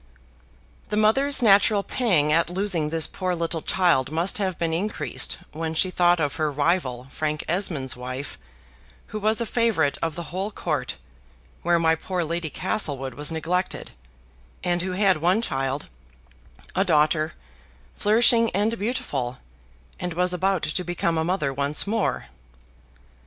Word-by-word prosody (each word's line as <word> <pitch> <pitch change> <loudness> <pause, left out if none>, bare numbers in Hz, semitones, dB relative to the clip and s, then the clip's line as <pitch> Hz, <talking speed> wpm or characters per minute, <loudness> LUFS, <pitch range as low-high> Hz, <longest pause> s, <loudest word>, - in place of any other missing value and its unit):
The 210 - -1
mother's 270 +6 +4
natural 200 -1 +5
pang 175 - +2
at 165 +1 +2
losing 180 -4 0
this 160 0 +1
poor 185 -2 -3
little 165 -1 -2
child 165 -9 +2
must 170 +7 +1
have 190 -3 -1
been 165 -1 -1
increased 200 +6 -1
when 160 +1 -4
she 185 +3 +2
thought 175 -1 +3
of 145 -1 -1
her 155 -2 0
rival 145 -4 0
Frank 150 -1 -2
Esmond's 165 -7 0
wife, 130 +2 -6 0.7
who 215 - -4
was 215 +2 +1
a 235 - +1
favorite 220 -12 +1
of 165 -2 -1
the 170 -2 -7
whole 190 +3 -2
Court, 150 - -3 0.7
where 175 0 +3
my 165 -1 +3
poor 175 +2 -2
Lady 165 0 -2
Castlewood 145 - -2
was 145 +5 +2
neglected, 175 +3 -2 0.7
and 175 -1 +1
who 185 +1 -3
had 190 -1 +3
one 175 +6 +2
child, 135 - -2 0.9
a 190 - +3
daughter, 155 -2 +2 0.6
flourishing 230 +2 +4
and 220 +3 0
beautiful, 140 - -2 0.6
and 180 -2 -4
was 180 +1 +2
about 190 0 0
to 155 +4 -1
become 175 -1 -1
a - - +1
mother 160 -5 -1
once 140 +2 +2
more. 220 +1 -1
175 Hz, 145 wpm, -24 LUFS, 150-195 Hz, 0.9 s, natural